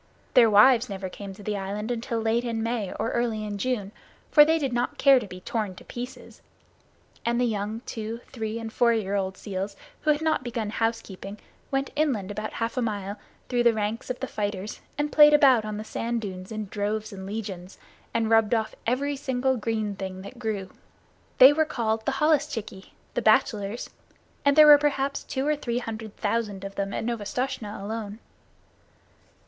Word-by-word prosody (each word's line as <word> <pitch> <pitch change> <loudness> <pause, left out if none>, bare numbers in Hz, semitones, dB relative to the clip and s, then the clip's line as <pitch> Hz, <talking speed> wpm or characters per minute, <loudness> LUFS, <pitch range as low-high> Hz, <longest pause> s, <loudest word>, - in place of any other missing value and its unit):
Their 235 -3 +7
wives 230 +4 +6
never 190 -1 -4
came 200 +1 -8
to 205 - -12
the 210 +1 -2
island 205 +3 -3
until 235 0 -2
late 225 +2 +1
in 230 -2 -2
May 230 -4 -2
or 230 - -2
early 230 -3 -1
in 205 -1 -4
June, 215 -5 -1 0.4
for 295 - +9
they 320 +2 +3
did 275 -5 -2
not 240 +1 -1
care 275 -2 +6
to 215 - -7
be 185 -1 -10
torn 210 -2 -3
to - - -12
pieces; 245 +1 -8 0.8
and 235 +1 +1
the 250 - +3
young 215 0 -2
two, 225 -1 -5
three, 220 -2 -4
and 225 -1 -6
four 235 -1 +4
year 205 -3 -1
old 190 -2 -1
seals 195 0 -4 0.3
who 310 - -1
had 300 +1 +3
not 315 -4 +1
begun 230 -3 -3
housekeeping 215 -3 -3 0.3
went 270 0 -1
inland 255 -11 0
about 215 +1 -4
half 230 +2 -3
a - - +2
mile 205 -3 -3 0.3
through 245 -1 +1
the 235 -1 +4
ranks 215 +1 -2
of 255 - -3
the 265 - -2
fighters 205 -2 -4 0.2
and 295 +1 -1
played 295 -1 +8
about 260 -7 +5
on 215 -1 -4
the 215 - -5
sand 230 +2 -2
dunes 185 -3 -7
in 215 -1 -3
droves 210 +2 -3
and 190 -1 -7
legions, 195 -3 -6 0.3
and 225 -1 0
rubbed 225 0 +4
off 220 -1 -1
every 280 +4 0
single 265 -1 0
green 220 -3 -2
thing 190 -1 -6
that 235 +5 -10
grew. 210 -5 -3 0.7
They 265 +3 +9
were 315 +1 +3
called 220 -6 -2
the 275 - +2
holluschickie 275 -9 0 0.2
the - - 0
bachelors 215 -2 +2 0.5
and 280 -1 +4
there 305 0 +9
were 295 -1 +9
perhaps 280 -1 0
two 265 0 -3
or 300 0 +2
three 240 -5 -3
hundred 220 -3 -6
thousand 210 -2 -1
of 195 0 -6
them 195 0 -2
at - - -3
Novastoshnah 235 0 -3
alone. 210 0 -5
225 Hz, 190 wpm, -26 LUFS, 205-255 Hz, 0.8 s, for